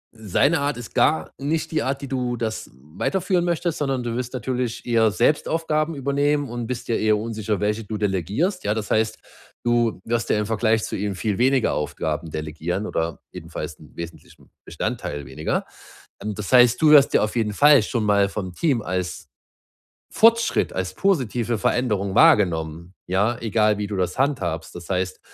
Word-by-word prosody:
seine 115 Hz, -, +1 dB
Art 140 Hz, -2 st, -1 dB
ist 120 Hz, -3 st, -9 dB
gar 160 Hz, -, +2 dB
nicht 155 Hz, +3 st, -1 dB
die 160 Hz, -, 0 dB
Art, 135 Hz, +1 st, -2 dB
wie -, -, -4 dB
du 125 Hz, -2 st, -2 dB
das 110 Hz, -1 st, -4 dB
weiterführen 170 Hz, -, -1 dB
möchtest, 170 Hz, -1 st, -1 dB
sondern 135 Hz, -4 st, -1 dB
du 120 Hz, -1 st, -3 dB
wirst 125 Hz, 0 st, -3 dB
natürlich 125 Hz, -2 st, -3 dB
eher 115 Hz, -2 st, +3 dB
selbst 120 Hz, +8 st, +1 dB
Aufgaben 160 Hz, -1 st, 0 dB
übernehmen 140 Hz, +1 st, 0 dB
und 120 Hz, -1 st, -4 dB
bist 125 Hz, 0 st, -5 dB
dir 115 Hz, -, 0 dB
eher 110 Hz, -1 st, +3 dB
unsicher, 110 Hz, -2 st, -3 dB
welche 105 Hz, +3 st, -1 dB
du 110 Hz, +1 st, -4 dB
delegierst, 105 Hz, -, -1 dB
ja? 105 Hz, -, 0 dB
Das 110 Hz, -2 st, -4 dB
heißt, 110 Hz, 0 st, +1 dB, 0.5 s
du 120 Hz, -4 st, +1 dB
wirst 115 Hz, 0 st, -1 dB
ja -, -, +3 dB
im 105 Hz, -, 0 dB
Vergleich 110 Hz, 0 st, +1 dB
zu -, -, -4 dB
ihm 100 Hz, 0 st, -2 dB
viel 105 Hz, +1 st, -2 dB
weniger 130 Hz, 0 st, +3 dB
Aufgaben 75 Hz, +2 st, -3 dB
delegieren 80 Hz, +6 st, -4 dB
oder 80 Hz, -4 st, -2 dB
jedenfalls 80 Hz, -, -7 dB
'n 75 Hz, -, -17 dB
wesentlichen 85 Hz, 0 st, -10 dB, 0.2 s
Bestandteil 70 Hz, -1 st, -4 dB
weniger. 65 Hz, +4 st, -2 dB, 0.6 s
Ähm, 105 Hz, 0 st, -4 dB
das 105 Hz, -1 st, -5 dB
heißt, 125 Hz, -1 st, +6 dB
du 155 Hz, -1 st, +5 dB
wirst 145 Hz, -2 st, +6 dB
ja -, -, +4 dB
auf 105 Hz, -, -2 dB
jeden 110 Hz, -3 st, 0 dB
Fall 145 Hz, +2 st, +6 dB
schon 115 Hz, +1 st, -2 dB
mal 100 Hz, -1 st, +3 dB
vom 95 Hz, -2 st, -5 dB
Team 130 Hz, -, 0 dB
als 90 Hz, -2 st, -3 dB, 0.9 s
Fortschritt, 230 Hz, +1 st, +3 dB
als 95 Hz, 0 st, -3 dB
positive 120 Hz, -, 0 dB
Veränderung 100 Hz, -4 st, 0 dB
wahrgenommen, 85 Hz, -2 st, +3 dB
ja, 100 Hz, +6 st, +1 dB
egal 105 Hz, -2 st, +2 dB
wie 105 Hz, -, -2 dB
du 105 Hz, -, -4 dB
das 90 Hz, -2 st, -1 dB
handhabst. 95 Hz, -, -1 dB
Das 90 Hz, -1 st, -10 dB
heißt, 95 Hz, -1 st, -1 dB
110 Hz, 180 wpm, -23 LUFS, 95-130 Hz, 0.9 s, heißt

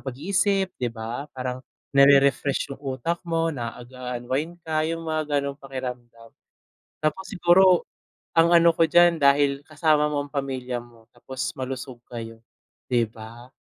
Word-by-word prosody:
pag-iisip 190 Hz, +7 st, 0 dB
'di 125 Hz, -, 0 dB
ba? 115 Hz, +5 st, -6 dB
Parang 130 Hz, 0 st, -4 dB, 0.3 s
nare-refresh 140 Hz, 0 st, +4 dB
yung 135 Hz, -, -11 dB, 0.2 s
utak 170 Hz, +7 st, -2 dB
mo, 165 Hz, 0 st, 0 dB
nag-a-unwind 125 Hz, +5 st, -5 dB
ka, 155 Hz, -1 st, 0 dB
yung 165 Hz, 0 st, -4 dB
mga 155 Hz, -1 st, -2 dB
ganong 140 Hz, 0 st, -5 dB
pakiramdam. 125 Hz, -4 st, -7 dB, 0.7 s
Tapos 155 Hz, +5 st, -1 dB
siguro 180 Hz, -2 st, +4 dB, 0.5 s
ang 165 Hz, 0 st, +5 dB
ano 170 Hz, 0 st, +5 dB
ko 165 Hz, 0 st, +2 dB
diyan 175 Hz, -1 st, +5 dB
dahil 140 Hz, 0 st, +3 dB
kasama 150 Hz, 0 st, +1 dB
mo 145 Hz, -1 st, -1 dB
ang -, -, -15 dB
pamilya 130 Hz, -3 st, -3 dB
mo 120 Hz, -2 st, -19 dB
tapos 120 Hz, -1 st, -5 dB
malusog 130 Hz, -1 st, -6 dB
kayo 115 Hz, -1 st, -8 dB, 0.5 s
'di 120 Hz, -2 st, +3 dB
ba. 115 Hz, +2 st, -11 dB
140 Hz, 135 wpm, -24 LUFS, 125-160 Hz, 0.7 s, ang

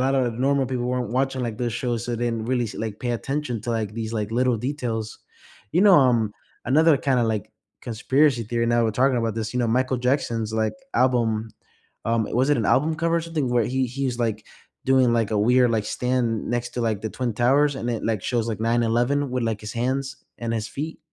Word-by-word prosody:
lotta 135 Hz, -2 st, +2 dB
normal 135 Hz, +4 st, +1 dB
people 125 Hz, -1 st, -2 dB
weren't 125 Hz, -1 st, -2 dB
watching, 130 Hz, 0 st, 0 dB
like, 115 Hz, -3 st, -4 dB
this 120 Hz, -2 st, -2 dB
show, 120 Hz, -2 st, -1 dB
so 120 Hz, +1 st, -3 dB
they 120 Hz, -, -2 dB
didn't 115 Hz, -1 st, -2 dB
really 125 Hz, -2 st, 0 dB
see 105 Hz, -, -8 dB
like, 110 Hz, -1 st, -4 dB
pay 125 Hz, -2 st, -2 dB
attention 125 Hz, -1 st, -2 dB
to, 120 Hz, -, -3 dB
like, 110 Hz, -3 st, -2 dB
these, 110 Hz, -1 st, -4 dB
like, 105 Hz, -1 st, -2 dB
little 125 Hz, +1 st, +2 dB
details. 115 Hz, -3 st, -3 dB, 0.5 s
You 175 Hz, -, +3 dB
know, 205 Hz, -2 st, +7 dB
um, 120 Hz, -6 st, +3 dB, 0.3 s
another 155 Hz, +3 st, +4 dB
kinda, 130 Hz, -2 st, +1 dB
like, 110 Hz, -3 st, -2 dB, 0.3 s
conspiracy 130 Hz, +2 st, +1 dB
theory, 115 Hz, +1 st, -1 dB
now 120 Hz, 0 st, +3 dB
we're 110 Hz, -, +2 dB
talking 130 Hz, +2 st, +2 dB
about 115 Hz, -2 st, -1 dB
this, 110 Hz, -1 st, -3 dB
you -, -, 0 dB
know, 120 Hz, -, +1 dB
Michael 130 Hz, +3 st, +1 dB
Jackson's, 120 Hz, -4 st, 0 dB
like, 110 Hz, 0 st, 0 dB, 0.2 s
album, 115 Hz, -4 st, +1 dB, 0.6 s
um 115 Hz, -1 st, +1 dB
was 130 Hz, +4 st, +2 dB
it 145 Hz, -, +4 dB
an 115 Hz, -, 0 dB
album 155 Hz, +4 st, +2 dB
cover, 165 Hz, +1 st, +1 dB
or -, -, +1 dB
something, 160 Hz, -6 st, -2 dB
where 120 Hz, -2 st, +2 dB
he 130 Hz, +3 st, 0 dB
he's, 130 Hz, 0 st, -3 dB
like, 110 Hz, -3 st, -2 dB, 0.4 s
doing, 130 Hz, -2 st, +4 dB
like, 115 Hz, -3 st, +1 dB
a 105 Hz, -, +2 dB
weird, 125 Hz, +3 st, +4 dB
like, 110 Hz, -2 st, 0 dB
stand 120 Hz, -1 st, -1 dB
next 120 Hz, 0 st, -2 dB
to, 120 Hz, -, -4 dB
like, 110 Hz, -3 st, -1 dB
the 110 Hz, -, -3 dB
Twin 125 Hz, -4 st, -3 dB
Towers, 140 Hz, +5 st, +3 dB
and 120 Hz, -2 st, -3 dB
it, 115 Hz, -, -3 dB
like, 110 Hz, -4 st, -1 dB
shows, 120 Hz, -2 st, -1 dB
like, 110 Hz, -1 st, -3 dB
9/11 120 Hz, +4 st, +1 dB
with, 125 Hz, -1 st, -1 dB
like, 110 Hz, -2 st, -2 dB
his 105 Hz, 0 st, -7 dB
hands, 130 Hz, +3 st, -1 dB, 0.2 s
and 115 Hz, -1 st, -2 dB
his 110 Hz, -1 st, -2 dB
feet? 155 Hz, +3 st, -5 dB
120 Hz, 220 wpm, -24 LUFS, 115-130 Hz, 0.6 s, know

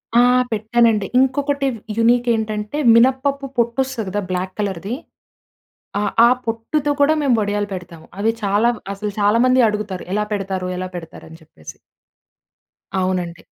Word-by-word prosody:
ఆ! 240 Hz, -, +7 dB, 0.3 s
పెట్టానండి. 220 Hz, -1 st, +2 dB
ఇంకొకటి 275 Hz, +1 st, +1 dB, 0.3 s
యూనిక్ 240 Hz, +1 st, +3 dB
ఏంటంటే, 215 Hz, +3 st, -3 dB, 0.2 s
మినపప్పు 265 Hz, +3 st, +2 dB
పొట్టొస్తదిగా 235 Hz, -4 st, -1 dB
బ్లాక్ 185 Hz, +1 st, -3 dB
కలర్‌ది. 200 Hz, +3 st, -3 dB, 1.1 s
అ! -, -, 0 dB, 0.2 s
ఆ -, -, +5 dB, 0.2 s
పొట్టుతో 235 Hz, +6 st, -1 dB
కూడా 290 Hz, +2 st, +5 dB
మేము 265 Hz, -5 st, +3 dB
వడియాలు 205 Hz, 0 st, -1 dB
పెడతాము. 175 Hz, -3 st, -9 dB
అవి 220 Hz, +2 st, +2 dB
చాలా 205 Hz, +4 st, +2 dB, 0.2 s
అసలు 205 Hz, +1 st, -4 dB
చాలా 205 Hz, +3 st, +3 dB
మందడుగుతారు. 215 Hz, -7 st, +1 dB
'ఎలా 210 Hz, +1 st, 0 dB
పెడతారు? 190 Hz, -2 st, -3 dB
ఎలా 185 Hz, 0 st, -3 dB
పెడతారు?" 165 Hz, -1 st, -10 dB
అని 160 Hz, 0 st, -13 dB
చెప్పేసి. 80 Hz, -, -13 dB, 1.2 s
అవునండి. 180 Hz, -2 st, -2 dB
215 Hz, 125 wpm, -20 LUFS, 190-245 Hz, 1.2 s, ఆ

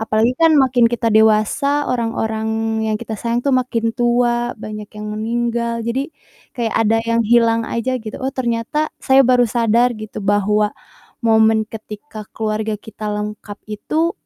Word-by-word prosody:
Apalagi 220 Hz, +2 st, +1 dB
kan 325 Hz, -1 st, +6 dB
makin 255 Hz, -2 st, +3 dB
kita 230 Hz, -1 st, 0 dB
dewasa 220 Hz, +7 st, +2 dB
orang-orang 225 Hz, -2 st, -1 dB, 0.4 s
yang 215 Hz, -1 st, 0 dB
kita 225 Hz, -2 st, -5 dB
sayang 235 Hz, +3 st, -1 dB
tuh 280 Hz, -, +2 dB
makin 230 Hz, -3 st, -1 dB
tua, 240 Hz, 0 st, +1 dB
banyak 210 Hz, -1 st, -7 dB
yang 210 Hz, 0 st, -7 dB
meninggal, 235 Hz, +1 st, -1 dB
jadi 260 Hz, +7 st, -3 dB, 0.4 s
kayak 230 Hz, -3 st, -2 dB
ada 225 Hz, 0 st, +3 dB
yang 230 Hz, 0 st, +2 dB
hilang 230 Hz, 0 st, +3 dB
aja 245 Hz, +3 st, -2 dB
gitu, 220 Hz, -3 st, -7 dB
oh, 265 Hz, -, -1 dB
ternyata 255 Hz, +4 st, -2 dB
saya 270 Hz, 0 st, +5 dB
baru 245 Hz, -1 st, +4 dB
sadar 235 Hz, +1 st, +2 dB
gitu, 215 Hz, 0 st, -7 dB
bahwa 205 Hz, +1 st, +2 dB, 0.6 s
momen 220 Hz, -1 st, +4 dB
ketika 215 Hz, +1 st, -10 dB
keluarga 215 Hz, 0 st, -2 dB
kita 215 Hz, 0 st, -8 dB
lengkap 210 Hz, 0 st, -5 dB
itu, 310 Hz, +11 st, -1 dB
230 Hz, 145 wpm, -19 LUFS, 215-240 Hz, 0.6 s, kan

